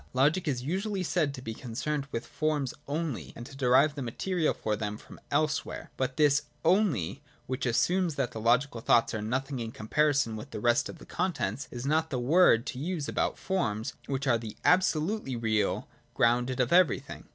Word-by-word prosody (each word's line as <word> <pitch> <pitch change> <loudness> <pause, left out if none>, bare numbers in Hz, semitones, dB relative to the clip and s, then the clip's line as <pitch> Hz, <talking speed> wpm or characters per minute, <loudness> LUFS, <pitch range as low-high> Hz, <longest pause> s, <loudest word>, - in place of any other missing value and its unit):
Logic 155 +7 +2
is 125 -4 -1
usually 190 +6 -2
said 160 -4 +1
to 130 -2 -9
be 115 - -4
concerned 140 +5 -3
with 115 +1 -3
forms 150 -4 -1
only 150 -2 -3
and 120 - -8
to 135 - -11
derive 135 +3 +4
the 140 - -6
material 160 +7 0
for 105 - -2
them 105 0 -4
from - - -14
elsewhere. 150 +1 -1
But 130 0 -2
this 145 -1 +4
' - - -23
only,' 170 - +2 0.2
which 130 0 -2
assumes 175 +7 +1
that 130 -4 -1
the 110 - -6
logical 120 +1 +2
thoughts 115 +1 +3
are 110 - -2
nothing 130 +5 -2
in 115 -1 -4
comparison 135 +1 +1
with 110 - -8
the - - -6
rest 120 +6 +2
of - - -8
the - - -13
contents, 170 -6 -2
is 120 +1 -6
not 160 +3 +1
the 130 - -2
word 125 -3 +5
to 125 - -5
use 160 -1 -3
about - - -1
forms 110 - -2
which 135 0 -2
are 120 -4 +3
the 110 -2 -8
absolutely 180 - +2
real 110 -3 0 0.3
ground 120 +2 +3
of 125 +4 +2
everything. 180 -2 +2
135 Hz, 190 wpm, -29 LUFS, 120-155 Hz, 0.3 s, word